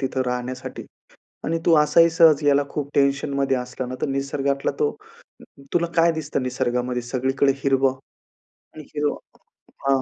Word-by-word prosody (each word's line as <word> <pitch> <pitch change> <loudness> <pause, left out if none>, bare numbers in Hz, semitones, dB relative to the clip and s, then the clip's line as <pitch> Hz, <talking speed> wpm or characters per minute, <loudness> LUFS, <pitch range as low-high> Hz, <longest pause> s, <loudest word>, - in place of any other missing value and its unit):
तिथं 130 -1 -1
राहण्यासाठी 125 +1 -4 0.6
आणि 165 +1 -1
तू 165 - +5
असाही 150 +3 +5
सहज 160 -2 +5
याला 145 0 +4
खूप 145 -1 -4
टेन्शनमध्ये 140 -1 +1
असला 125 +1 -5
ना, 130 - -5
तर - - 0
निसर्गातला 140 0 -1
तो 440 -1 +2 0.8
तुला 170 -1 +2
काय 170 0 +5
दिसतं 150 -4 -3
निसर्गामध्ये 125 -1 -1
सगळीकडे 130 +3 +1
हिरवं 135 -1 +2 0.8
आणि 155 - -9
हिरवं 145 0 0 0.7
हां. 135 -1 +3
140 Hz, 140 wpm, -23 LUFS, 130-150 Hz, 0.8 s, तू